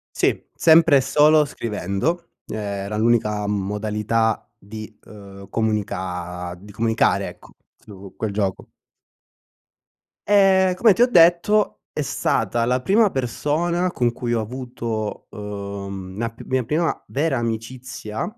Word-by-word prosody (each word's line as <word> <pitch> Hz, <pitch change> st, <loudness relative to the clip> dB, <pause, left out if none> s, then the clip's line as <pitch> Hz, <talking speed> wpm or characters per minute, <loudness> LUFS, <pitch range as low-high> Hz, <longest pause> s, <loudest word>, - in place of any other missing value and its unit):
Sì, -, -, +1 dB
sempre 160 Hz, -2 st, +6 dB
e -, -, +3 dB
solo 150 Hz, +3 st, +4 dB
scrivendo, 115 Hz, -, -3 dB, 0.2 s
ehm, -, -, -5 dB
era 100 Hz, 0 st, -4 dB
l'unica 105 Hz, -2 st, +1 dB
modalità 105 Hz, +2 st, -1 dB
di, 110 Hz, +1 st, -10 dB
uhm, 100 Hz, -2 st, -12 dB
comunica 90 Hz, -5 st, -3 dB
di 105 Hz, +2 st, -13 dB
comunicare 115 Hz, +1 st, +1 dB
ecco -, -, -15 dB, 0.3 s
su 100 Hz, -2 st, -13 dB
quel 110 Hz, -, -2 dB
gioco. 100 Hz, -2 st, -2 dB, 1.6 s
Ehm, 190 Hz, -2 st, +4 dB
come 215 Hz, +3 st, +5 dB
ti 230 Hz, -, -1 dB
ho 245 Hz, -, +7 dB
detto 175 Hz, +1 st, +4 dB
è -, -, -3 dB
stata 115 Hz, -4 st, 0 dB
la 125 Hz, +1 st, +1 dB
prima 205 Hz, -, +4 dB
persona 170 Hz, +7 st, -1 dB
con 120 Hz, -6 st, +1 dB
cui 120 Hz, 0 st, -3 dB
ho 115 Hz, -, +1 dB
avuto, 115 Hz, -2 st, -5 dB
uhm, 100 Hz, -2 st, -7 dB
la 115 Hz, +1 st, -1 dB
p 115 Hz, -, -13 dB
mia 130 Hz, -1 st, 0 dB
prima 160 Hz, +7 st, -1 dB
vera 140 Hz, 0 st, 0 dB
amicizia, 115 Hz, -1 st, -4 dB
115 Hz, 125 wpm, -22 LUFS, 105-150 Hz, 1.6 s, ho